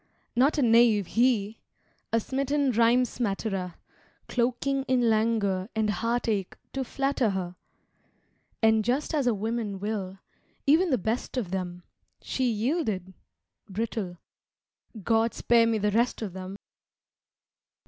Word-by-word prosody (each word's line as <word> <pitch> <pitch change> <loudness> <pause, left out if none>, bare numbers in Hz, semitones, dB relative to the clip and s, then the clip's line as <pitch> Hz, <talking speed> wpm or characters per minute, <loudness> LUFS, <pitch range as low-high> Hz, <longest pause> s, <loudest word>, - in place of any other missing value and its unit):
Not 270 +6 +3
a 285 - +3
knave, 230 -3 +5
he! 225 -1 +1 0.5
A 230 - +3
smitten 275 +3 0
rhyme 235 +2 +4
smatterer, 195 -6 -3 0.5
Cloaking 255 +3 0
in 245 -3 +3
languor 215 -3 +1
And 215 -1 +1
heartache 220 -1 -1 0.2
to 270 - -1
flatter 270 -2 0
her. 185 -2 -3 1.1
And 220 -1 +4
just 260 +8 -1
as 285 -5 +1
a 240 - +4
woman 215 -1 -3
will 200 -2 -3 0.5
even 325 +6 +4
the 260 - +3
best 225 +6 -3
of 205 -8 -2
them 180 -2 -4 0.4
She 260 -2 -1
yielded 215 - -1 0.6
brittle. 200 -3 -3 0.9
God 225 +1 +2
spare 230 -1 +4
me 225 -1 +1
the 210 0 +1
rest 235 +2 +1
of 195 -5 -5
them! 190 +1 -7
225 Hz, 125 wpm, -27 LUFS, 200-250 Hz, 1.1 s, knave